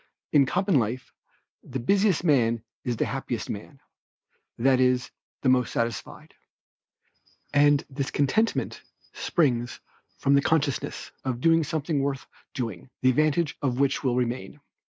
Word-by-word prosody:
In 140 -3 +5
common 185 -1 +2
life, 120 +3 -3 0.5
the 135 - -6
busiest 195 - +2
man 120 -8 +2 0.2
is 120 -2 -2
the - - +1
happiest 125 -3 -4
man, 120 +7 -8 0.8
that 130 +2 +3
is 125 -1 +2 0.3
the 130 - +3
most 125 -1 +3
satisfied; 115 -1 -4 1.2
and 145 +1 +4
this 140 -1 -3
contentment 215 - 0 0.3
springs 120 -8 0 0.4
from 140 - +2
the 140 - +5
consciousness 145 -2 -1
of 130 -3 -2
doing 165 +3 +4
something 150 -1 -1
worth 135 -1 -2 0.3
doing, 115 -4 -4
the 130 - +6
advantage 155 +3 +1
of 130 -2 -1
which 140 0 +1
will 125 -3 +1
remain. 120 -5 -2
135 Hz, 130 wpm, -26 LUFS, 125-150 Hz, 1.2 s, the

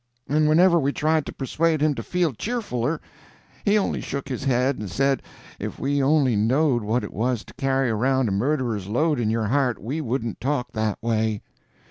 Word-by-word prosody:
And 150 +2 +2
whenever 170 +2 +5
we 140 -1 +1
tried 155 -1 +1
to - - -4
persuade 155 +4 0
him 150 0 +2
to - - -5
feel 175 -5 0
cheerfuler, 160 - -2 0.6
he 205 0 +3
only 205 - 0
shook 140 0 -5
his 130 +1 -4
head 130 +1 +1
and 105 -3 -5
said 135 +7 +1 0.4
if - - -5
we 140 +1 0
only 135 -3 +3
knowed 125 +4 +2
what 110 +3 0
it 105 - -7
was 120 0 -1
to - - -14
carry 135 -2 0
around 130 +3 +1
a - - -1
murderer's 115 -2 -1
load 145 +6 +1
in 110 -3 0
your 110 0 0
heart 130 -3 +1
we 140 +9 -3
wouldn't 120 -4 -3
talk 130 -2 -1
that 110 -2 -1
way. 110 -2 0
135 Hz, 190 wpm, -24 LUFS, 115-150 Hz, 0.6 s, whenever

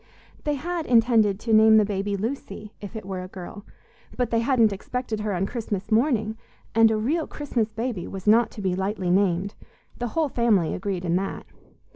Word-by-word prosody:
They 295 -1 +1
had 335 +3 -3
intended 225 -4 +4
to 225 - 0
name 220 0 +7
the 215 - +5
baby 200 0 -2
Lucy, 215 -2 -5
if 205 +2 -8
it 215 - -6
were 190 -1 -4
a 185 - -7
girl; 190 +3 -10 0.5
but 245 -2 0
they 230 - +2
hadn't 230 -3 +3
expected 225 +2 -4
her 210 0 -2
on 190 0 0
Christmas 210 -2 -4
morning, 220 -2 +1 0.3
and 225 0 +6
a 220 - +1
real 295 +9 0
Christmas 240 -7 -2
baby 225 -4 -3
was 190 -1 -7
not 225 +2 +5
to 205 - -7
be 185 -1 +1
lightly 190 -1 -1
named 190 +1 +1 0.5
the 245 - -1
whole 320 -2 +3
family 220 -10 +2
agreed 185 -2 -3
in 170 +1 +2
that. 195 +1 -4
215 Hz, 190 wpm, -25 LUFS, 195-235 Hz, 0.5 s, name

